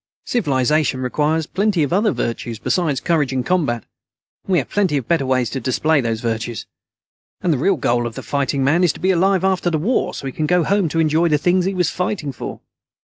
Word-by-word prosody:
Civilization 150 - +1
requires 150 +5 0
plenty 195 -1 0
of 145 - -1
other 210 +3 +3
virtues 115 -4 -3
besides 150 - 0
courage 155 -6 0
in 130 -1 -1
combat, 140 - 0 0.6
and - - -6
we - - +4
have 140 - 0
plenty 190 -8 +1
of 125 -4 -4
better 160 -6 +1
ways 130 -2 +1
to 135 - -3
display 145 +5 +1
those 115 -2 -2
virtues. 115 -1 -3 0.8
And 175 - +2
the 135 - -1
real 190 +5 +2
goal 120 -2 0
of 115 - -8
the - - -7
fighting 140 -1 -1
man 160 +7 +3
is 175 - +3
to - - -12
be 190 - +2
alive 190 +1 +2
after 190 -2 +1
the 160 - 0
war 215 +12 0
so - - -7
he 135 - -4
can 155 - -1
go 180 0 +3
home 195 -2 +1
to 165 - -1
enjoy 160 +2 +3
the 150 - +3
things 180 +4 +2
he 195 0 -1
was 180 -3 +1
fighting 180 -5 -2
for." 130 - -7
155 Hz, 225 wpm, -20 LUFS, 130-180 Hz, 0.8 s, we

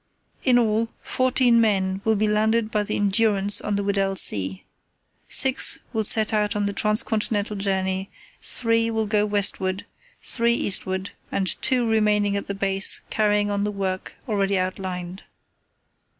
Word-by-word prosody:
"In 250 -3 +3
all, 225 -1 0
fourteen 255 -2 +2
men 195 -3 0
will 220 0 +1
be 215 +1 0
landed 215 +1 0
by 210 - 0
the 205 - -3
Endurance 205 0 +2
on 210 - -2
the 200 - -2
Weddell 195 -1 -1
Sea. 95 - +2 0.6
Six 265 -1 +5 0.2
will 220 -1 -1
set 215 +1 +3
out 210 -1 0
on 205 -1 -1
the 200 - -2
Trans 210 +1 +1
continental 210 -1 -2
journey, 190 -1 -2 0.3
three 230 -1 0
will 220 -1 -1
go 210 0 0
westward, 195 -2 0 0.3
three 235 -1 0
eastward, 190 -2 -1 0.2
and 190 -4 0
two 250 -2 +1
remain 210 -2 +1
at 200 - -3
the 200 - -4
base 195 0 +2
carrying 210 -1 +1
on 200 0 -1
the 210 - -1
work 190 -2 -5
already 200 -3 0
outlined. 185 0 -5
205 Hz, 150 wpm, -23 LUFS, 195-220 Hz, 0.6 s, Six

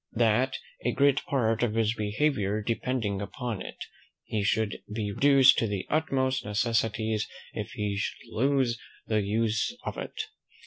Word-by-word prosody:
"That, 115 +2 +2 0.3
a - - +1
great 140 -1 +3
part 115 -4 +1
of 115 -3 +1
his 115 -1 +2
behaviour 105 -2 0
depending 115 -3 -1
upon 105 +2 -4
it, - - -7 0.4
he 110 - -2
should 105 0 0
be 105 -1 -2
reduced 140 +4 +6
to 115 - +1
the 100 -2 -3
utmost 130 -4 +1
necessities 110 0 0 0.3
if 105 +3 -5
he 105 -4 -2
should 100 - -4
lose 130 -1 +2 0.3
the 110 -1 +1
use 110 - 0
of - - -4
it. - - -7
115 Hz, 145 wpm, -28 LUFS, 105-130 Hz, 0.4 s, reduced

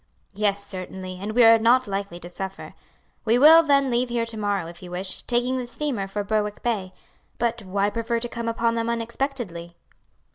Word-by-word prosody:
"Yes, 200 0 0
certainly; 185 -1 -6
and 210 +2 -4
we 245 +1 +5
are 225 0 +7
not 245 +3 +4
likely 195 -4 -4
to 175 - -6
suffer. 190 +2 -7 0.5
We 230 +1 +3
Will, 315 +5 +9
then, 280 -4 +2
leave 240 +1 +1
here 235 -1 0
to 230 -1 -7
morrow, 205 -4 -1
if 170 +1 -11
you 180 - -9
wish, 185 +1 -3
taking 250 +2 0
the 245 - -5
steamer 245 -6 -3
for 205 +1 -3
Berwick 210 0 -2
Bay. 205 -6 -1 0.5
But 235 0 -1
why 200 +1 -1
prefer 230 +1 -1
to 240 - -3
come 235 -1 -5
upon 230 0 +1
them 230 0 -1
unexpectedly?" 230 -7 -4
225 Hz, 190 wpm, -24 LUFS, 195-240 Hz, 0.5 s, Will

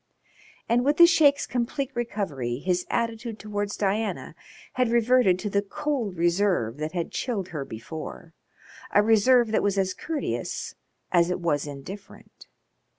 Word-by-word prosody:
And 240 +2 +2
with 290 +3 +2
the 345 - +10
Sheik's 300 -4 +4
complete 255 +3 -2
recovery 190 - -3
his 180 +4 -1
attitude 230 -1 -2
towards 205 -1 -4
Diana 210 +2 -1 0.4
had 250 -2 +1
reverted 235 -4 +4
to 200 +3 -4
the 200 - +2
cold 220 - -3
reserve 170 - +1
that 155 +2 -4
had 175 -2 -3
chilled 195 0 -3
her 150 -4 -4
before 160 +7 -8 0.6
a 205 - +5
reserve 225 +2 +4
that - - +2
was 200 -1 0
as 190 -1 +1
courteous 315 - -4 0.4
as 175 -1 +4
it 180 - -1
was 150 -4 0
indifferent. 145 +8 -11
205 Hz, 145 wpm, -26 LUFS, 175-240 Hz, 0.6 s, the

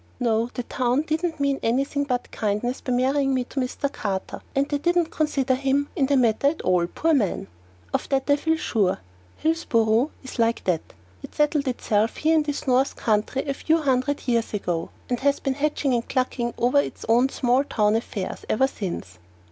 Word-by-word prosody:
No, 230 -1 +1
the 245 - -2
town 255 +3 0
didn't 320 +1 -2
mean 280 -1 +1
anything 275 +4 0
but 250 -3 -2
kindness 215 +4 -2
by 255 - -3
marrying 270 +2 +2
me 255 - +1
to 270 - -5
Mr. 265 +2 -2
Carter, 195 -3 -4
and 275 +1 +2
they 290 -1 -1
didn't 345 +1 +1
consider 280 -4 +1
him 275 +2 0
in 280 -7 +2
the 280 0 +3
matter 240 +2 +3
at 300 +3 0
all, 180 -2 +2
poor 325 - 0
man! 215 - +1 0.5
Of - - -1
that 270 -1 0
I 285 - +5
feel 320 +2 +1
sure. 210 -11 +1 0.4
Hillsboro 235 -6 +2
is 260 -1 -9
like 230 0 +2
that. 175 -4 +1 0.4
It - - -11
settled 295 -1 +1
itself 225 -3 0
here 315 +1 +2
in 315 - +4
this 295 -1 -3
north 260 +1 +2
country 215 +4 0
a 275 - 0
few 320 +4 +1
hundreds 280 -2 0
of - - -17
years 230 -3 +1
ago, 175 -4 -2 0.2
and 245 -1 -1
has 280 +1 +2
been 270 - -1
hatching 285 -1 0
and 235 -1 -1
clucking 250 -2 -1
over 250 +4 +3
its - - -3
own 240 +4 +4
small 255 0 +2
affairs 210 -2 -1
ever 265 +5 +3
since. 175 - -5
260 Hz, 190 wpm, -24 LUFS, 230-285 Hz, 0.5 s, I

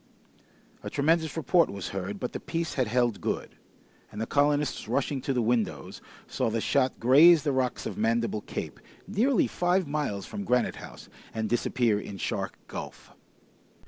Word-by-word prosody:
A - - -5
tremendous 160 +2 +1
report 165 +1 +3
was 100 -2 -5
heard, 95 +1 -4
but 125 - -4
the - - -4
piece 165 -3 -3
had 130 -4 0
held 120 -2 +1
good, - - -3 0.6
and 105 - -8
the 110 - -1
colonists 145 -1 +1
rushing 135 +3 -1
to 135 - -2
the 125 -3 +1
windows, 110 - -1 0.2
saw - - -1
the 115 +1 -1
shot 130 +3 +1
graze 150 +7 +7
the 145 - +1
rocks 130 -2 -1
of - - -5
Mandible 115 -1 0
Cape, - - -6 0.3
nearly 220 +4 +2
five 180 0 +1
miles 140 -10 -2
from 205 -1 -6
Granite 125 -10 +1
House, - - -11 0.3
and 110 -1 -1
disappear 115 -1 +1
in 100 -1 -7
Shark - - -3
Gulf. - - -8
130 Hz, 165 wpm, -28 LUFS, 110-155 Hz, 0.6 s, graze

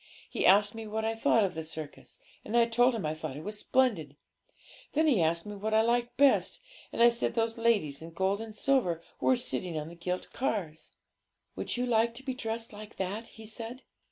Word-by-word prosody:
He - - +1
asked 205 +2 +5
me 225 -1 -7
what 220 +1 -2
I 225 - +1
thought 225 0 +3
of 190 -2 0
the 160 - -5
circus; 155 -2 -9 0.3
and 235 - -1
I 235 - +6
told 245 +2 +3
him 215 - -3
I 155 - 0
thought 155 -3 -6
it 160 +8 -5
splendid. 210 - +1 0.8
Then 315 +2 +3
he 255 - +4
asked 165 +1 +1
me 210 0 -6
what 215 +2 -1
I 220 - +5
liked 240 +1 0
best, 280 0 +4 0.3
and 235 - +2
I 240 - +9
said 235 0 -1
those 225 -1 +1
ladies 200 -12 +1
in 165 - -8
gold 190 +5 0
and 220 -1 -8
silver 215 - +1 0.2
who - - -1
were 260 - +6
sitting 185 -8 -1
on 155 +1 -4
the 170 - -11
gilt 180 +2 -4
cars. 180 -11 -3 0.6
'"Would - - -3
you 250 - 0
like 230 -1 +2
to 265 - -9
be 265 -1 -2
dressed 225 -2 -4
like 210 +1 -10
that?" 200 +5 -4
he 220 - -10
said. 230 +3 -6
220 Hz, 215 wpm, -30 LUFS, 175-235 Hz, 0.8 s, I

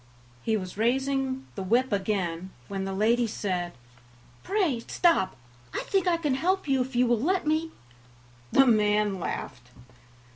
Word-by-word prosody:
He 220 -1 +1
was 185 0 -7
raising 265 +2 0
the 195 - -5
whip 235 +7 +2
again, 190 -3 -1 0.2
when 195 -1 -3
the 195 - -3
lady 230 +5 +2
said: 180 -5 -3 0.7
"Pray, 365 - 0
stop; 330 - +2 0.4
I - - 0
think 385 -2 0
I 345 -1 +3
can 300 -5 0
help 365 +6 0
you 270 -2 +2
if 255 0 -4
you 250 +1 +4
will 235 -2 +2
let 370 +5 +1
me." 315 +2 +1 0.8
The 270 - +6
man 210 -4 +3
laughed. 125 -6 -5
240 Hz, 150 wpm, -27 LUFS, 195-275 Hz, 0.8 s, The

